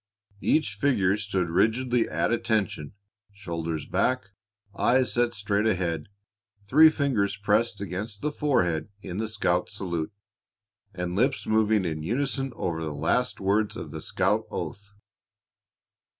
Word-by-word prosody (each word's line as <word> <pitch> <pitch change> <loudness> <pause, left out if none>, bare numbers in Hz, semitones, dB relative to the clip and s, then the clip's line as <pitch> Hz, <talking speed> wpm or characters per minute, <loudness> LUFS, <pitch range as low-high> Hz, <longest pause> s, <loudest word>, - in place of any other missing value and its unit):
Each 155 - +2
figure 100 -10 +2
stood 95 -5 -2
rigidly 120 +6 +2
at - - 0
attention, 110 -10 -1 0.4
shoulders 85 -6 -4
back, 125 -6 0 0.4
eyes 130 +4 +3
set 120 -1 +1
straight 100 +1 0
ahead, 90 -5 -1 0.6
three 155 +9 +7
fingers 120 -10 0
pressed 105 +1 +1
against 100 +2 -4
the 150 - 0
forehead 90 - +1
in 90 - -5
the 110 - -1
scout 90 -5 0
salute, 85 -4 -3 0.8
and 90 -2 -4
lips 130 +6 +1
moving 110 -2 +2
in 80 -2 -2
unison 135 - -1
over 80 -6 -2
the 75 -2 -4
last 80 +12 0
words 100 +2 +1
of - - -7
the - - -6
scout - - 0
oath. 100 +1 -6
105 Hz, 130 wpm, -27 LUFS, 90-120 Hz, 0.8 s, three